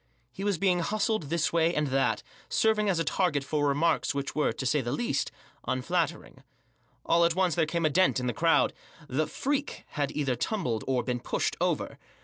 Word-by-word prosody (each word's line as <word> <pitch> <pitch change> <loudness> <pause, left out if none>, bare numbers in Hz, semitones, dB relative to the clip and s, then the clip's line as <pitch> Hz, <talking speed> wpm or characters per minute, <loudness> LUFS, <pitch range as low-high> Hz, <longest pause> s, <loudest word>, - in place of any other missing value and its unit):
He 195 - -7
was 200 -3 +1
being 180 0 +2
hustled 210 -2 -1
this 165 0 0
way 170 +1 +2
and 150 - +1
that; 135 +1 +1 0.3
serving 215 -2 +2
as 185 - +1
a 165 - +1
target 155 -3 +1
for 145 +1 0
remarks 145 +1 +1
which 140 0 -3
were, 150 - +1
to 130 - -5
say 145 +3 +2
the 120 -1 -3
least> 140 - -1 0.4
unflattering. 130 -1 -2 0.6
All 170 +1 +4
at 170 -1 +3
once 185 -2 +2
there 165 -3 +1
came 170 +1 -1
a - - +4
dent 185 -3 +3
in 125 - -3
the 120 - 0
crowd* 165 +5 +3 0.3
The 150 +4 0
'Freak" 285 +1 -2
had 145 -2 -2
either 135 -4 0
tumbled, 125 - -2
or 130 -2 +1
been 125 -1 -2
pushed, - - -1
over. - - -1
160 Hz, 195 wpm, -28 LUFS, 140-185 Hz, 0.6 s, All